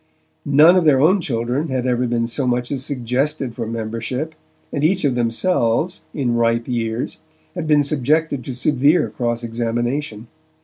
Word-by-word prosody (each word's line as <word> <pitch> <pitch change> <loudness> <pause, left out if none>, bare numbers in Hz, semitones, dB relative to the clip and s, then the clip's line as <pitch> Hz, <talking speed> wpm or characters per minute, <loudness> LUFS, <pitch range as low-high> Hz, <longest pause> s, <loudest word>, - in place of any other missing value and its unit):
None 150 +5 +6
of 180 -3 +3
their 140 -4 +5
own 180 +7 +4
children 125 +2 -2
had 130 -3 -2
ever 125 0 +1
been 115 0 0
so 125 +3 -1
much 125 0 -1
as 135 -2 -3
suggested 130 +1 -2
for 115 - -5
membership, 115 +6 -4 0.4
and 145 - -2
each 180 +1 +2
of 135 - +2
themselves, 120 +5 0
in 130 -5 -1
ripe 115 0 +1
years, 115 +1 -3 0.3
had 175 -4 -4
been 150 -1 +4
subjected 145 0 0
to 130 - -5
severe 140 0 +2
cross 120 +1 -2
examination. 120 +1 -2
125 Hz, 160 wpm, -20 LUFS, 115-150 Hz, 0.4 s, None